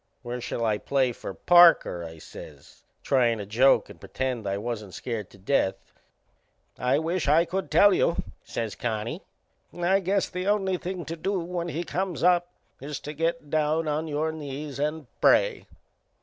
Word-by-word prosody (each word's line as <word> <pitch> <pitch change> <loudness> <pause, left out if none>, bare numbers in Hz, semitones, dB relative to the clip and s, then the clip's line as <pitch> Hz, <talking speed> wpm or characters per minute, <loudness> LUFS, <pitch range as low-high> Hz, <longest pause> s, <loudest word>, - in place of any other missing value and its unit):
"Where 120 0 -5
shall 115 0 -3
I 105 -2 +1
play 135 -3 +1
for 115 - -7
Parker?" 170 - +5
I 80 -1 -9
says, - - -13 0.2
tryin' 120 -4 +2
to 105 - -5
joke 120 +7 +4
and - - -13
pretend 125 -5 -3
I 100 0 -1
wasn't 105 -3 -5
scared 110 -6 -4
to - - -17
death. 95 0 +1 1.0
"I 125 +2 +2
wisht 165 +1 -1
I 165 +3 +5
could 190 +3 -3
tell 205 -1 +6
you," 170 - +2 0.3
says 115 -3 -4
Connie. 115 - -3 0.5
"I 175 +3 +1
guess 195 +1 0
the 180 +1 -4
only 195 -3 +1
thing 180 -1 -5
to 165 - -5
do 190 +4 -1
when 170 0 -4
he 170 0 -3
comes 180 -1 -3
up 175 0 +4 0.3
is 145 +2 -6
to 150 - -6
get 165 -1 -2
down 155 +1 +1
on 155 +2 -1
your 155 +1 -1
knees 145 -2 -6
and 150 +1 -2 0.2
pray." - - +3
150 Hz, 170 wpm, -26 LUFS, 120-175 Hz, 1.0 s, tell